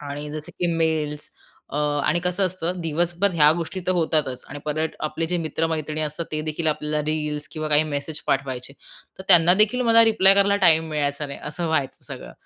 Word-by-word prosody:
आणि 145 +1 -6
जसं 155 0 -6
की 175 - +2
मेल्स 155 -2 -1 0.4
अ, 145 - -6 0.3
आणि 175 - +2
कसं 180 +2 +1
असतं, 180 0 -4
दिवसभर 175 +4 0
ह्या 150 -2 +6
गोष्टी 170 +2 -4
तर 185 - +2
होतातच 155 -6 -1
आणि 145 - -7
परत 155 +1 -1 0.2
आपले 165 +2 -3
जे 180 - -1
मित्र-मैत्रिणी 155 -1 -2
असतात 155 +2 -2
तेदेखील 155 +1 -3
आपल्याला 150 0 -1
रील्स 150 -1 -2
किंवा 155 -1 -4
काही 150 +1 +4
मेसेज 150 +1 -4
पाठवायचे, 130 -1 -2 0.5
तर - - -7
त्यांनादेखील 190 +7 +5
मला 230 0 +7
रिप्लाय 195 -3 +5
करायला 200 0 +3
टाईम 160 0 +4
मिळायचा 145 0 -1
नाही 140 - -8
असं 160 +3 -4
व्हायचं 145 -4 -2
सगळं. - - -9
155 Hz, 180 wpm, -23 LUFS, 150-175 Hz, 0.5 s, मला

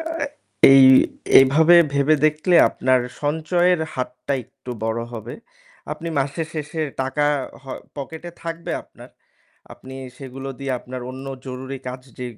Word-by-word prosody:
আ - - -3 0.7
এই 135 0 +8 0.6
এইভাবে 155 +6 +6 0.2
ভেবে 140 +2 +3
দেখলে 155 +4 +2
আপনার 130 0 +1 0.2
সঞ্চয়ের 165 +4 +1
হাতটা 125 +2 -4
একটু 130 +1 -12
বড় 115 +1 -1
হবে। 115 +1 -7 0.6
আপনি 170 - -6
মাসের 145 +4 -2
শেষে 155 +1 -4 0.2
টাকা 135 +3 -1 0.4
হ - - -24 0.3
পকেটে 160 +4 -7
থাকবে 165 0 -5
আপনার। - - -16 0.6
আপনি 130 0 -12 0.2
সেগুলো 135 0 -8
দিয়ে 135 -1 -2
আপনার 130 0 -8
অন্য 130 +1 -9 0.2
জরুরি 130 +1 -6
কাজ 125 +1 -6 0.2
যে 125 - -4
135 Hz, 130 wpm, -22 LUFS, 130-160 Hz, 0.7 s, এই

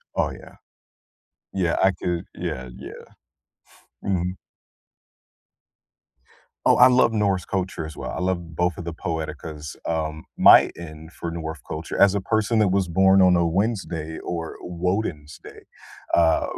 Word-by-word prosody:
Oh, - - +1
yeah. - - -13 1.0
Yeah, 90 -4 0
I 95 - +5
could 85 -1 -3
yeah, 65 0 -5
yeah. - - -9 1.1
Mhm. 90 -1 -1 2.3
Oh, - - +6
I 125 - +8
love 125 -2 +4
Norse 100 -5 +1
culture, 90 -4 -3
as 80 - -11
well, - - -5
I - - -5
love 85 -3 -2
both 90 0 0
of 90 - -7
the 85 - -4
poeticas, 80 -2 -5
um, 80 -1 -3
my - - +8
end 80 -1 -10
for 85 -1 -6
North 80 -2 -5
culture 80 +2 -5
as 100 -1 +6
a 100 - -1
person 110 +2 +1
that 105 - +4
was 95 0 +1
born 95 +3 +4
on 90 -1 +6
a 85 -1 +2
Wednesday, 85 -4 -2
or 85 -2 -5
Woden's 90 -4 -3
day, - - -12 0.5
uh, 80 -2 +4
85 Hz, 145 wpm, -23 LUFS, 80-95 Hz, 2.3 s, I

